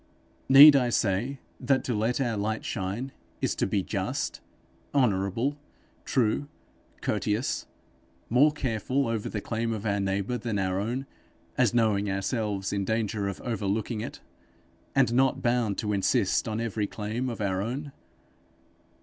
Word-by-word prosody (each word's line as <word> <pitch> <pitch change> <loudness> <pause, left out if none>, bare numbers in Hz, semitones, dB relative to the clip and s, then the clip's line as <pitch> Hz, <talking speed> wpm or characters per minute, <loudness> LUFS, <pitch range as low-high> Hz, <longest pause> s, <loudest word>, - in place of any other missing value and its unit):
Need 140 +2 +11
I 125 -3 +3
say 115 +5 0 0.2
that 135 -1 +1
to 125 - -1
let 110 +4 0
our 120 -4 0
light 110 +2 -2
shine 105 +7 -3 0.3
is - - 0
to - - +1
be 95 -1 0
just, - - -3 0.5
honourable, 120 +3 +1 0.5
true, 130 +3 +1 0.5
courteous, 105 +5 -1 0.6
more 140 +6 +5
careful 130 -1 -1
over 115 -2 -2
the 105 - -4
claim 115 +1 -2
of 110 -1 -4
our 100 -1 +1
neighbour 100 +5 -1
than 115 -4 -2
our 95 -1 0
own, 120 +6 -2 0.5
as 120 -3 +2
knowing 105 -3 +2
ourselves 100 0 -2
in 100 -1 0
danger 110 -1 -1
of 100 - -4
overlooking 110 -1 -2
it, - - -7 0.7
and 115 - +3
not 130 +1 +2
bound 120 -4 +1
to 105 -1 -1
insist 100 -1 +1
on 110 0 -2
every 110 -3 -1
claim 110 +6 -3
of 115 - -6
our 95 -2 0
own! 135 +7 -4
110 Hz, 145 wpm, -27 LUFS, 100-125 Hz, 0.7 s, Need